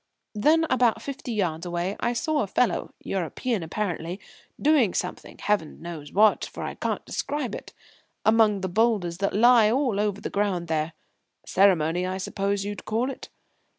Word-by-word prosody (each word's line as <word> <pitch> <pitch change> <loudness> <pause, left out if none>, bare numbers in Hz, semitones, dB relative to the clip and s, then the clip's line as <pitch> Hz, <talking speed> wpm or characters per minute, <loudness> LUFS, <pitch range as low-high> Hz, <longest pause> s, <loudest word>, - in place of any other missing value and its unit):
Then, 310 +10 +3
about 250 -4 +2
fifty 275 -2 -6
yards 175 -7 -1
away, 175 +2 -2
I 240 - 0
saw 300 +5 0
a - - -1
fellow 200 0 0
European 195 - -2
apparently 175 0 -3 0.4
doing 280 - +3
something 180 - -4
Heaven 205 -7 -1
knows 165 -4 -8
what, 215 +2 +4
for - - -6
I - - -4
can't - - -3
describe 280 -6 -3
it - - -7 0.5
among 220 -2 +4
the 190 - -1
boulders 190 -3 +1
that 200 0 0
lie 230 0 +6
all 245 -4 +1
over 205 -1 0
the - - -5
ground 190 -5 -1
there. 155 0 -1 0.5
Ceremony, 180 -2 +3
I 185 0 -2
suppose 195 +1 -2
you'd 205 -1 -5
call 235 +5 -1
it. - - -10
205 Hz, 160 wpm, -26 LUFS, 180-235 Hz, 0.5 s, lie